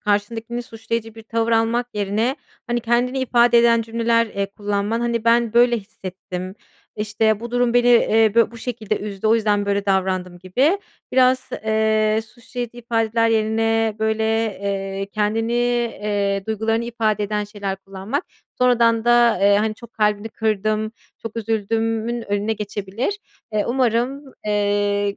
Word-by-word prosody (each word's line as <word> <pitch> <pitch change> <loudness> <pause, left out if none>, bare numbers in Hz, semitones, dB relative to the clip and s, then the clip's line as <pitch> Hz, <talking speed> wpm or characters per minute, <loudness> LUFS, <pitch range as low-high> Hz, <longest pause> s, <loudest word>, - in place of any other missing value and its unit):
karşındakini 225 +3 -1
suçlayıcı 225 -1 -5
bir 225 - -11
tavır 230 +1 -1
almak 230 +2 +2
yerine, 210 +6 0 0.3
hani, 240 -1 -1
kendini 240 +3 +1
ifade 240 -2 +4
eden 230 -1 +4
cümleler, 230 +1 +1
eee, 200 -2 -3
kullanman 205 +2 -2
Hani, 235 -1 -1
"Ben, 230 -1 +3
böyle 240 0 +5
hissettim. 185 -3 -7 0.4
İşte, 215 0 +1
bu 235 0 -6
durum 245 0 +1
beni, 245 0 +4
eee, 225 -3 +4
bö 230 - +4
bu 235 - -12
şekilde 220 -3 -3
üzdü. 205 0 -4
O 220 - +5
yüzden 210 -2 +1
böyle 200 0 0
davrandım." 185 -2 0
gibi 255 - +1 0.3
biraz, 255 0 +3 0.2
eee, 220 0 +2
suçlayıcı 240 0 -7
ifadeler 230 -1 +1
yerine 225 0 +1
böyle, 220 0 0 0.4
eee, 195 0 -3
kendini, 220 +2 0
eee, 210 -5 0
duygularını 225 +1 0
ifade 220 -3 0
eden 210 0 -1
şeyler 205 -2 -4
kullanmak, 195 - -5 0.3
sonradan 235 -2 +3
da, 240 -3 +4
eee, 200 0 +5
hani, 215 +1 0
"Çok 235 +1 -14
kalbini 210 0 0
kırdım, 215 0 -1 0.3
çok 225 0 -7
üzüldüm."ün 225 +1 -1
önüne 205 +2 0
geçebilir. 210 - -3 0.3
Eee, 210 -1 +1
umarım, 255 +3 0 0.2
eee, 205 -1 +1
225 Hz, 140 wpm, -21 LUFS, 205-235 Hz, 0.4 s, böyle